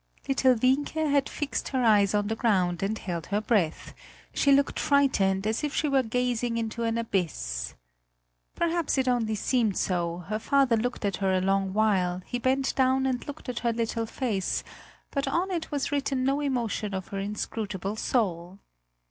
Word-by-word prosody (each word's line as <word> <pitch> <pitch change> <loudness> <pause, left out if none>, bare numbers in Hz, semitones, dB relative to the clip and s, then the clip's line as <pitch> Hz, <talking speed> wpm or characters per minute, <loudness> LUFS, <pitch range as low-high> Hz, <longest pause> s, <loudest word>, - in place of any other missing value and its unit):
Little 265 -1 +4
Wienke 260 +6 +1 0.2
had 280 -1 +2
fixed 290 -1 -3
her 260 -2 0
eyes 210 -3 +4
on 205 0 +1
the 220 +2 -1
ground 185 -7 +1
and 205 +3 -1
held 170 -5 -5
her 205 - 0
breath; 210 -7 0 0.4
she 280 - +3
looked 280 0 +3
frightened 205 -9 +2
as 220 +6 -1
if 295 -1 -2
she 305 - +1
were 275 -2 +3
gazing 245 0 -1
into 230 0 -3
an 230 0 0
abyss. - - -2 0.8
Perhaps 340 -3 0
it 265 -1 +1
only 230 -3 +1
seemed 220 -2 +1
so; 175 -1 -1
her 215 +1 -2
father 270 0 +3
looked 240 0 -2
at 200 -2 0
her 195 -1 +1
a - - +2
long 195 +1 +1
while, 190 -4 +1
he 245 - -3
bent 265 +2 +1
down 265 0 +3
and 255 +1 -1
looked 285 - -8
at 245 -1 -3
her 235 -1 0
little 230 0 -2
face, 215 -7 -1 0.5
but 275 -1 -1
on 350 +7 0
it 335 -3 -3
was 290 -2 -2
written 275 -2 0
no 275 +2 +1
emotion 235 -7 -1
of 190 -1 -5
her 195 - -4
inscrutable 205 -1 -3
soul. 185 -6 -1
230 Hz, 180 wpm, -27 LUFS, 195-265 Hz, 0.8 s, Little